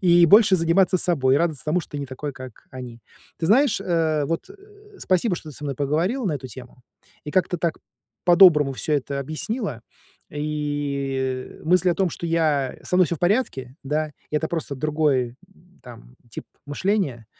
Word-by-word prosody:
и 175 -2 +5
больше 205 +1 +6
заниматься 180 +2 +3
собой, 140 -7 +2
радоваться 160 -4 -1
тому, 155 +4 +1
что - - -14
ты 145 - -4
не 140 - -4
такой, 135 +3 -6
как 130 -3 -11
они. 125 -3 -9 0.4
Ты 165 - -1
знаешь, 240 - +3
э, 160 -5 0
вот 165 - -3 0.5
спасибо, 185 0 +1
что 155 - -9
ты 145 - -11
со 150 - -8
мной 140 -3 -3
поговорила 165 - 0
на 175 - 0
эту 135 -3 -5
тему, 125 +1 -12 0.4
и 150 - -5
как-то 180 +1 +1
так 165 -1 -1 0.5
по-доброму 170 -6 +6
всё 150 +4 -1
это 140 0 -2
объяснила, 155 - -4 0.5
и 140 -3 -3
мысль 180 +2 +3
о - - +1
том, 190 0 +1
что 170 - -8
я 155 -5 0
со 180 - 0
мной 180 -1 +5
всё 170 - -2
в - - -19
порядке, 175 - 0
да, 150 +2 -2 0.2
это 150 +1 0
просто 160 -4 -3
другой 145 -4 0 0.5
там 115 - -14
тип - - -8 0.2
мышления, 145 - -1
155 Hz, 170 wpm, -23 LUFS, 135-175 Hz, 0.5 s, больше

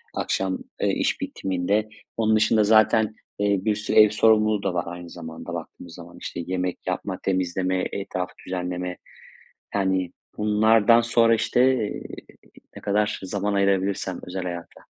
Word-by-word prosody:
Akşam, 95 -1 -1 0.2
eee, - - +2
iş - - 0
bitiminde. 95 +3 -1 0.3
Onun 110 -1 +3
dışında 110 0 +4
zaten, 110 0 +4 0.2
eee, 100 -1 +2
bir 105 - +2
sürü 105 0 -2
ev 105 -1 +9
sorumluluğu 110 -1 +3
da 95 -2 0
var 85 -1 0
aynı 85 0 -7
zamanda, 80 -2 -8
baktığımız 85 -2 -8
zaman. 85 0 -12
İşte, - - -5
yemek 90 0 -3
yapma, 90 +1 -3
temizleme, 95 0 0
etrafı 90 -2 -4
düzenleme, 90 0 -4 0.8
yani, 95 -3 0 0.3
bunlardan 110 +2 +4
sonra, 115 0 +4
işte, 125 - +1 0.3
eee, - - -6 0.7
ne - - -9
kadar 105 +1 0
zaman 100 +2 -2
ayırabilirsem 100 -1 0
özel 90 +1 -5
hayata. 85 -1 -7
95 Hz, 140 wpm, -24 LUFS, 90-105 Hz, 0.8 s, ev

